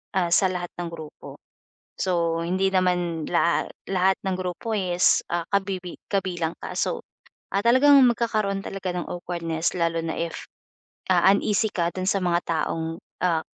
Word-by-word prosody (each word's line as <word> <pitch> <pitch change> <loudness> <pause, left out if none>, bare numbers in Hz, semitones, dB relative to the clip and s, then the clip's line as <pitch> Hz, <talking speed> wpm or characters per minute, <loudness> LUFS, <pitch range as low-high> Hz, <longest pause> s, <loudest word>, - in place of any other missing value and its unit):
ah, 180 -3 +2
sa 190 +3 +5
lahat 175 -1 -4
ng 175 - -2
grupo. 160 -2 -10 0.6
So 170 -3 0
hindi 185 +3 +1
naman 180 -4 +1
lahat 170 0 +1 0.2
lahat 190 0 +2
ng 190 -1 0
grupo 185 +5 -4
is, 180 -2 +3
ah, 175 -1 0
kabibi 190 -3 -1 0.2
kabilang 175 -4 -1
ka, - - -6
so, - - 0 0.5
ah, 200 - +2
talagang 260 +4 +6
magkakaroon 215 -4 0
talaga 190 -2 -4
ng 175 - -3
awkwardness 170 -2 -2
lalo 165 -1 +1
na 160 - -2
if, 170 0 -4 0.7
ah, - - +5
uneasy 210 +1 +1
ka 170 -2 +1
dun 185 0 -3
sa 195 - +2
mga 175 -1 +2
taong, 165 0 -2 0.3
ah, 165 -3 +2
180 Hz, 155 wpm, -25 LUFS, 170-195 Hz, 0.7 s, talagang